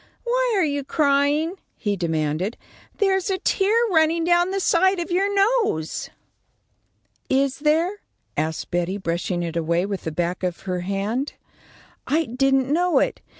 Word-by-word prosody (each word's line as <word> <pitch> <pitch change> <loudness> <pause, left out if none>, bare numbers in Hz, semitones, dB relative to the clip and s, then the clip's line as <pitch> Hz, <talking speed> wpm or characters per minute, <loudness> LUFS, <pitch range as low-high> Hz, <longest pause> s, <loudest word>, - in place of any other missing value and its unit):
"Why - - +1
are 370 - +3
you 285 -1 -2
crying?" 290 +4 +1 0.2
he 205 -1 -1
demanded. 165 +3 -1 0.4
"There's 385 -2 +1
a 380 - +1
tear 395 +3 +1
running 325 0 +3
down 350 +1 +3
the 390 +1 -1
side 375 +1 +3
of 345 0 -4
your 390 +3 +2 0.3
nose." 160 - -3 1.2
"Is 270 0 +1
there?" 330 +7 +1 0.3
asked 160 0 -2
Betty, 175 +2 -1
brushing 175 -1 -2
it 170 -1 -4
away 170 +2 +1
with 200 -1 -4
the 160 - -2
back 175 +3 -2
of 180 -2 -3
her 185 -2 -3
hand. 200 +9 -2 0.7
"I 320 +3 +2
didn't 270 +2 +1
know 355 +2 +2
it. - - +1
275 Hz, 150 wpm, -23 LUFS, -, 1.2 s, are